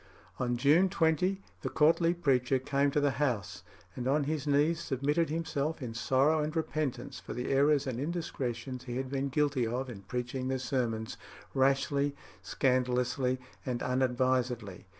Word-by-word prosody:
On 120 -1 0
June 155 +9 +4
20 180 +2 +1 0.2
the - - -2
courtly 165 +3 +3
preacher 135 -5 +2
came 140 +2 +1
to 145 - +1
the 145 -1 0
House, 120 -10 -1 0.3
and 125 0 -3
on 145 +2 +2
his 150 0 -2
knees 150 +4 +3
submitted 150 +2 0
himself 160 -1 -2
in 125 -5 -5
sorrow 135 +6 +2
and 155 +2 -3
repentance 155 -4 -2
for - - -7
the 125 +2 -3
errors 140 +1 +4
and 125 -3 -3
indiscretions 130 -6 -3
he 120 -1 -4
had 130 0 -3
been 140 0 -1
guilty 140 -3 +1
of 125 +3 -3
in 100 -4 -9
preaching 125 +3 -3
the 130 0 0
sermons 120 -4 -2 0.4
"rashly, 140 +1 +2 0.3
scandalously, 125 0 +1 0.2
and 125 -2 -3
unadvisedly." 125 -5 0
135 Hz, 150 wpm, -31 LUFS, 125-150 Hz, 0.4 s, June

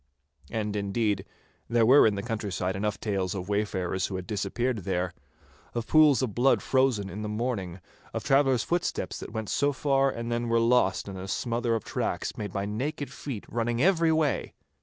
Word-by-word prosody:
And, 105 -2 -2
indeed, 100 -1 0 0.4
there 115 -1 +4
were 130 +1 +7
in 105 - +1
the 100 - -4
countryside 100 -5 -2
enough 105 +1 -2
tales 95 -3 -1
of 95 0 -5
wayfarers 95 -3 -1
who 95 - -5
had 90 -1 -4
disappeared 110 +4 -1
there, 90 -1 -2 0.6
of 120 -1 -2
pools 150 -3 +5
of 115 -5 -2
blood 130 +5 +3
frozen 130 -7 +2
in 95 +3 -6
the 105 - -3
morning, 105 -5 -3 0.3
of - - -4
traveller's 135 -4 +3
footsteps 175 0 -2
that - - -8
went 110 -2 -4
so 145 0 +2
far 135 0 +2
and 115 -2 -4
then 120 0 -1
were 115 0 +3
lost 115 -6 +2
in 95 -1 -6
a 95 +1 -6
smother 120 +2 0
of 110 - -3
tracks - - -2
made 105 -2 -5
by 100 +1 -2
naked 135 +8 -3
feet 125 -8 -6
running 120 0 -1
every 165 +1 +4
way. 155 -3 0
110 Hz, 185 wpm, -28 LUFS, 100-130 Hz, 0.6 s, were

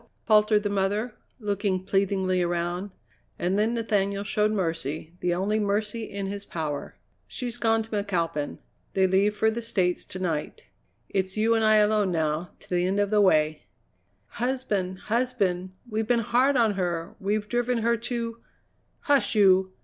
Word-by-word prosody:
faltered 210 -1 +4
the - - 0
mother, 205 +4 0 0.3
looking 200 -3 -1
pleadingly 190 -1 +1
around. 175 +2 -1 0.5
And 185 +3 0
then 225 +3 +1
Nathaniel 200 -3 0
showed 210 +1 +1
mercy, 165 -5 -2
the 175 -1 0
only 205 +4 0
mercy 210 +2 -1
in 200 -1 -5
his 200 +1 -4
power. 155 -6 -4 0.3
"She's 240 -1 -4
gone 225 -1 +2
to 220 - -14
McAlpin. 175 -8 -1 0.4
They 190 -1 +4
leave 195 +3 +2
for 220 +1 +3
the 235 +2 -4
States 185 -6 0
to - - -7
night. 180 - -3 0.4
It's 190 0 -2
you 225 +2 +3
and 225 -1 +2
I 215 0 +5
alone 210 -2 +3
now 160 +1 -1
to - - -16
the 180 0 +2
end 195 +2 0
of 205 0 +1
the 210 -1 +4
way." 155 -5 +2 0.6
"Husband, 225 -7 -2
husband! 215 -6 0 0.2
We've 220 -1 -2
been 240 -1 +3
hard 260 +5 +3
on 225 -3 +3
her; 175 -3 -3
we've 210 +2 -1
driven 240 0 0
her 235 +1 +3
to 230 0 -4 0.3
" - - -43
"Hush, 280 -4 +2
you! 190 -2 +5
200 Hz, 165 wpm, -26 LUFS, 185-220 Hz, 0.6 s, I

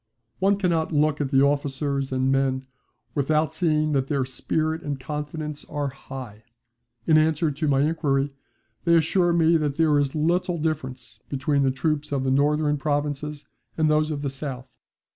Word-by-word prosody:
One 195 +1 +3
cannot 170 -5 0
look 150 -1 +2
at 140 - -1
the 135 -1 +4
officers 140 -1 0
and 130 0 +1
men 135 -1 +1 0.5
without 150 +1 +1
seeing 155 -3 +1
that 135 -2 +1
their 140 -3 0
spirit 155 +5 -2
and 145 -2 -4
confidence 150 +2 -5
are 145 -1 -3
high. 130 -5 -9 0.6
In 155 -1 +5
answer 155 0 +2
to 150 +2 -2
my 135 -1 +3
inquiry 145 -3 0 0.5
they 170 -1 +4
assure 175 +2 +3
me 165 0 +4
that 150 -3 -1
there 155 -2 +3
is 140 0 -1
little 170 +3 +1
difference 155 -5 -4
between 140 +1 0
the 135 - +3
troops 150 +3 -1
of 135 -2 0
the 130 - +1
northern 150 +2 +2
provinces 145 0 -2 0.3
and 155 -1 +3
those 155 0 +2
of 145 -2 -3
the 140 - -1
south. 135 -2 -5
145 Hz, 165 wpm, -24 LUFS, 135-155 Hz, 0.6 s, In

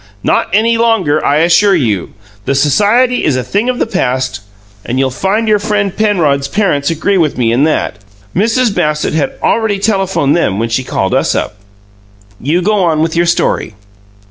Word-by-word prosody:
"Not - - +1
any 225 +4 +2
longer, 205 -10 +1
I 145 +2 +2
assure 175 +4 +4
you! 110 - -1 0.3
The 135 - 0
society 210 - +2
is 145 - +1
a 130 - -1
thing 210 - -1
of 250 - -1
the - - 0
past 130 - -2 0.4
and 125 - -3
you'll 135 0 +1
find 200 - -1
your 210 -1 +3
friend 200 -2 -1
Penrod's 160 -10 +1
parents 145 -5 0
agree 175 +4 0
with 155 -6 0
me 115 -3 +1
in 130 +5 +2
that. 155 -10 -1 0.4
Mrs. 225 +3 +1
Bassett 150 -4 -1
had 155 -2 -1
already 220 -3 +1
telephoned 195 -8 0
them 105 - 0
when 115 +2 -2
she 120 +3 -1
called - - -2
us - - +1
up. - - -2 0.9
You 165 +7 0
go 210 +3 +1
on 160 -3 +1
with 165 0 -2
your 170 +1 +2
story!" 140 -9 0
170 Hz, 180 wpm, -13 LUFS, 140-210 Hz, 0.9 s, assure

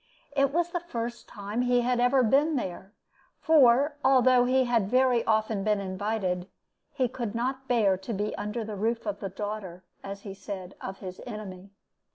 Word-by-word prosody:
It 275 -1 +3
was 345 +3 0
the 350 - -1
first 240 -8 -5
time 205 +3 -4
he 245 0 +3
had 245 0 +1
ever 250 +2 +4
been 285 +7 +3
there; 190 -5 -4 0.5
for 285 -1 +4
although 255 -2 +5
he 260 +1 +3
had 235 -5 +1
very 255 -1 +3
often 220 -2 +1
been 210 -1 +1
invited, 190 -2 -2 0.4
he 255 - 0
could 235 -3 -5
not 260 +3 -2
bear 215 -6 +3
to 190 +5 -7
be 210 0 -2
under 210 +3 -3
the 215 -1 -6
roof 230 +4 -1
of 205 -1 -3
the 195 - -4
daughter, 195 -2 -6 0.2
as 200 0 -7
he 200 -2 -7
said, 190 -1 -7
of 190 0 -7
his 185 -2 -7
enemy. 200 -4 -8
225 Hz, 180 wpm, -28 LUFS, 200-250 Hz, 0.5 s, although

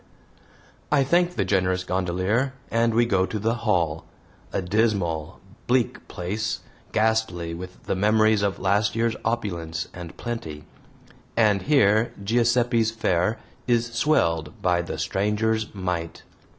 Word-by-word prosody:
I 145 -2 +4
thank 175 +5 +2
the - - 0
generous 95 -2 +1
gondolier, 95 +8 0 0.2
and 115 0 +2
we 120 +1 +4
go 95 -5 +2
to 110 - -3
the 110 +2 0
Hall 90 -9 0 0.5
a - - -1
dismal, 95 -5 0 0.3
bleak 125 -1 0
place, 105 +5 -3 0.3
ghastly 110 -7 0
with 90 +2 -9
the - - -1
memories 110 +2 +3
of 100 -2 0
last 100 +2 +1
year's 115 -1 +1
opulence 90 -8 -2
and 90 -2 -9
plenty, 80 -11 -5 0.7
and 105 -4 +4
here 115 -6 +3
Giuseppe's 120 +1 +2
fare 110 -2 0 0.3
is 115 -1 +1
swelled 85 - +1
by 90 -1 +2
the 85 -2 -5
stranger's 105 +6 0
mite. 90 -3 -3
105 Hz, 125 wpm, -24 LUFS, 90-115 Hz, 0.7 s, I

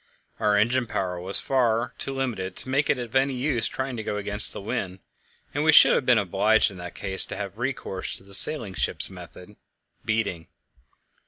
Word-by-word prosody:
Our 105 -1 +2
engine 120 +4 +2
power 90 -4 -3
was 95 +2 +4
far 120 -2 0
too 135 - -3
limited 110 -9 -3
to - - -7
make 140 +2 +1
it - - +3
of 120 0 -7
any 135 0 +2
use 125 -3 +1
trying 130 -1 -4
to 110 - -4
go 105 - -3
against 105 +1 -1
the - - -6
wind, 95 -2 -4 0.6
and 145 - -1
we 160 - +5
should - - +8
have 125 - 0
been 125 -2 +5
obliged 105 +2 +2
in 95 - -11
that 90 0 -8
case 95 -1 0
to - - -7
have 100 +1 -6
recourse 125 -7 -3
to - - -13
the 100 0 -13
sailing 110 -3 0
ship's 95 - -2
method 90 +2 -12 0.5
beating. 110 -7 -2
110 Hz, 195 wpm, -25 LUFS, 95-130 Hz, 0.6 s, should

